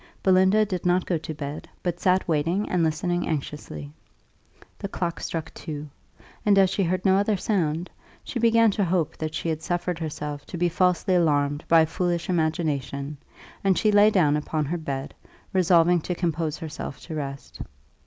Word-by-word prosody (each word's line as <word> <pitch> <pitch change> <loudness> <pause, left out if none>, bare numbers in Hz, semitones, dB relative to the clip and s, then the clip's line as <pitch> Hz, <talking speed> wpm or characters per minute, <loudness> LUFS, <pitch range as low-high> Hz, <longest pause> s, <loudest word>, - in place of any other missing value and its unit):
Belinda 190 +3 +5
did 185 -3 -4
not 180 0 +2
go 170 -3 0
to 160 - -6
bed, 145 0 -6
but 175 -1 -2
sat 185 0 +2
waiting 170 +6 0
and 180 - +1
listening 175 +3 0
anxiously. 135 - -5 0.9
The - - -3
clock 170 -3 -3
struck 165 -2 -4
two; 150 -2 -7 0.5
and 205 -1 +4
as 190 -1 +5
she 195 - 0
heard 185 +1 0
no 190 0 +5
other 205 +1 +1
sound, 175 -4 0 0.4
she 245 - -4
began 230 -1 +5
to 200 - 0
hope 175 -3 0
that 155 0 -4
she 155 - -3
had 160 -1 -1
suffered 175 0 -2
herself 150 -2 -5
to 175 - -6
be 175 +1 +2
falsely 180 +2 +2
alarmed 145 -4 +2
by 165 -1 +6
a - - +4
foolish 175 +1 -2
imagination, 150 -4 -1 0.5
and 195 -2 +3
she 215 - +3
lay 205 +1 +6
down 165 -8 +3
upon 150 0 -1
her 170 +5 -2
bed, 140 -2 -4 0.4
resolving 175 -2 +4
to 180 - -3
compose 165 -3 -1
herself 155 -4 -6
to 165 - -8
rest. 140 -2 -6
170 Hz, 175 wpm, -25 LUFS, 150-185 Hz, 0.9 s, by